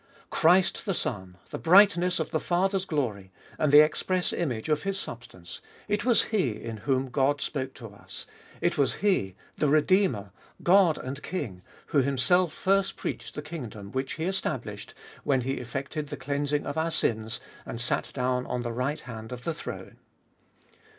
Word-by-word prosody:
Christ 180 +5 +3
the 195 - +1
Son, 95 - -3
the - - -4
brightness 180 0 +5
of 160 - -2
the 160 - +1
Father's 190 +3 +1
glory, 110 - -2 0.3
and 155 -2 +2
the 145 +1 +10
express 180 +4 0
image 125 -10 -2
of 150 -1 +1
His 195 0 -2
substance, - - -9 0.3
it 210 0 0
was 240 -2 +4
He 190 - 0
in 115 -1 -6
whom 130 +3 0
God 140 +3 +2
spoke 135 -2 -3
to 115 -3 -9
us; 100 - -10 0.4
it - - +1
was 135 -3 +2
He, 185 - +1 0.2
the 150 - +3
Redeemer, 150 - +3 0.3
God 180 -3 +5
and 130 +2 -6
King, 115 - -4 0.2
who 150 - +2
Himself 140 +6 +3
first 195 +4 +1
preached - - -5
the 150 - -5
kingdom 115 -11 -7
which 130 +1 -2
He 160 - -3
established 125 - -3 0.3
when 135 -2 +2
He 135 +2 -2
effected 140 +5 -4
the 145 0 -6
cleansing 145 +2 -1
of - - -2
our 165 +1 +1
sins, 110 -8 -1 0.2
and 115 - -6
sat 120 - -1
down 125 -1 -1
on 125 -1 -2
the 120 -1 -3
right 130 +5 -2
hand 110 -2 -8
of 125 0 -7
the 165 - -1
throne. - - -8
145 Hz, 170 wpm, -28 LUFS, 125-175 Hz, 0.4 s, the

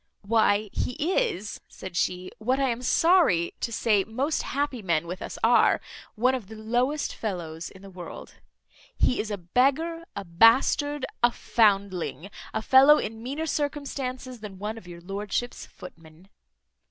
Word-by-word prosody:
"Why, 210 -1 +2
he - - -2
is," 365 - -1
said 190 -2 -10
she, 180 +1 -1
"what 255 +5 0
I 270 -1 +2
am 235 0 -2
sorry 310 - +3
to 235 - -3
say 210 -3 +2
most 265 +9 -1
happy 280 -3 -2
men 170 -4 0
with 180 +3 -6
us - - -6
are, - - +5 0.4
one 250 +4 +2
of 245 -7 -4
the 220 - -10
lowest 245 +7 -1
fellows 170 -6 -5
in 190 - -16
the 195 - -10
world. 180 -3 -9 0.6
He 250 - +2
is 215 - -2
a 205 - -3
beggar, 280 - 0
a 200 - -5
bastard, 255 - +4 0.2
a 240 0 +5
foundling, 200 - 0 0.2
a 220 - -3
fellow 275 +5 +7
in 220 +1 -4
meaner 280 +7 -3
circumstances 275 -4 -3
than 205 -3 -9
one 215 +3 -5
of 180 - -18
your 170 -1 -10
lordship's 205 +6 -4
footmen." 165 0 -14
220 Hz, 155 wpm, -26 LUFS, 190-265 Hz, 0.6 s, fellow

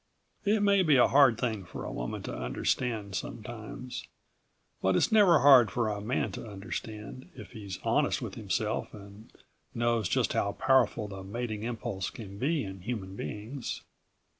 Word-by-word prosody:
It 205 +1 +3
may 200 -1 +5
be 155 -5 +4
a 125 - +6
hard 135 -5 +6
thing 110 -5 -1
for 85 - -8
a - - -4
woman - - -4
to - - -5
understand, 100 - -1
sometimes. 115 +5 -6 0.7
But 95 0 +2
it's - - +3
never 195 - +6
hard 130 -5 +8
for 115 +1 0
a 105 -1 -3
man 110 -1 -1
to 105 - -7
understand, 105 +3 -7
if 110 -5 -10
he's 100 -4 -7
honest - - +2
with - - -5
himself - - -2
and 100 +1 -13 0.4
knows 115 -4 +1
just - - +1
how - - 0
powerful 120 -5 +2
the 95 -1 -7
mating 110 +2 -4
impulse 110 -5 -3
can 100 -3 -9
be 150 +4 +1
in 95 -1 -7
human 95 -3 -5
beings. 105 - -5
110 Hz, 165 wpm, -30 LUFS, 100-125 Hz, 0.7 s, hard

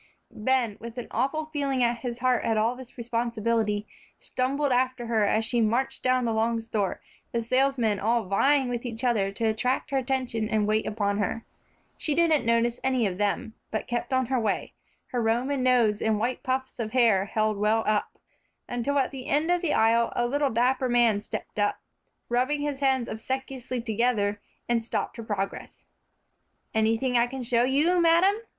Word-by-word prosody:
Ben, 235 -1 0
with 235 +1 -9
an 245 - -5
awful 275 +7 -1
feeling 275 -3 0
at 235 0 +1
his 240 -2 -4
heart 255 -1 +2
at 225 -1 +1
all 225 +3 +1
this 255 0 -12
responsibility, 230 -3 -1 0.3
stumbled 275 +2 -1
after 255 0 +1
her 225 -2 +2
as 220 +2 +1
she 235 0 +1
marched 235 +5 0
down 255 -1 +2
the 230 - 0
long 225 +1 +1
store, 220 -4 -2 0.3
the 235 -1 -1
salesmen 250 -4 +2
all 230 +3 +1
vying 265 +8 +2
with 240 -1 -3
each 230 -1 -5
other 215 -6 +1
to 200 - -6
attract 250 +5 0
her 275 - +1
attention 245 -4 -2
and 215 -1 +1
wait 215 +1 +1
upon 205 -1 -1
her. 215 +3 -2 0.5
She 305 -5 0
didn't 320 -6 +3
notice 230 +1 +2
any 260 -3 +2
of 190 -1 -2
them, 205 +2 -1 0.2
but 220 - -3
kept 240 +1 -3
on 260 0 +2
her 255 +1 0
way, 215 -3 -2 0.4
her 245 - 0
Roman 245 +5 0
nose 240 -5 +3
and 220 -1 +1
white 240 +4 -1
puffs 260 0 -3
of 220 -1 -3
hair 225 -7 +4
held 215 0 0
well 215 +2 +2
up, 210 -1 0 0.5
until 245 +4 -1
at 270 - +1
the 260 -2 -8
end 310 +4 +1
of 355 -1 +2
the 340 -4 0
aisle 230 +1 +3
a 240 - +1
little 285 +3 +1
dapper 250 +2 +1
man 235 -4 +3
stepped 210 - -6
up, 205 0 +1 0.5
rubbing 255 +5 0
his 290 -2 -2
hands 265 -3 +2
obsequiously 260 +2 -4
together, 220 -3 0 0.3
and 235 -1 +1
stopped 230 - -3
her 230 - -6
progress. 195 -3 -5 0.9
"Anything 225 +3 +2
I 235 - +3
can 260 +1 -6
show 240 0 +2
you, 310 +7 +3
madam?" 340 +4 +5
240 Hz, 185 wpm, -26 LUFS, 220-260 Hz, 0.9 s, madam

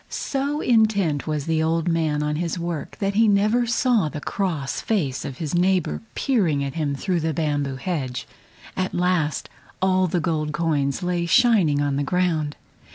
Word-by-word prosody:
So 285 +2 -2
intent 205 - +2
was 150 -2 -2
the 160 -1 +1
old 165 +1 0
man 160 -3 +1
on 150 0 -1
his 170 +1 -2
work 170 -3 -4
that 200 -1 -1
he 225 +2 +4
never 215 +4 +3
saw 235 - +2
the 150 - -6
cross 160 -5 -2
face 155 - -1
of 135 -3 -6
his 155 -1 -4
neighbor 175 - +1
peering 180 - +1
at 135 -1 -4
him 150 -4 -1
through 180 +4 -1
the 160 -1 -1
bamboo 145 -4 -1
hedge. 130 -4 -3 0.5
At 185 0 -2
last 175 -4 0 0.3
all 185 0 +2
the 175 +1 0
gold 155 -3 -1
coins 150 -1 0
lay 175 -1 -1
shining 190 - +4
on 140 -1 0
the 145 - 0
ground. 160 -2 0
165 Hz, 170 wpm, -23 LUFS, 150-190 Hz, 0.5 s, he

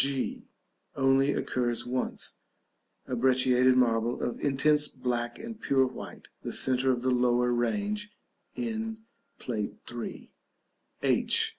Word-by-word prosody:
g. 135 -1 -2 0.5
Occurs 135 -3 +1
only 120 - -6
once. 130 - -2 0.7
A - - -6
brecciated 130 0 +4
marble 120 -1 +1
of 120 - -3
intense 150 +2 +4
black 120 -2 -3
and 230 -1 -8
pure 135 -1 +3
white, 130 - -8
the - - -5
centre 130 0 +3
of 125 -1 -2
the 130 - +2
lower 125 0 +2
range 205 - -1 0.5
in 225 -2 -3 0.4
Plate - - -4 0.2
III. - - -7 0.7
h. 445 -1 +3
130 Hz, 120 wpm, -28 LUFS, 125-145 Hz, 0.7 s, brecciated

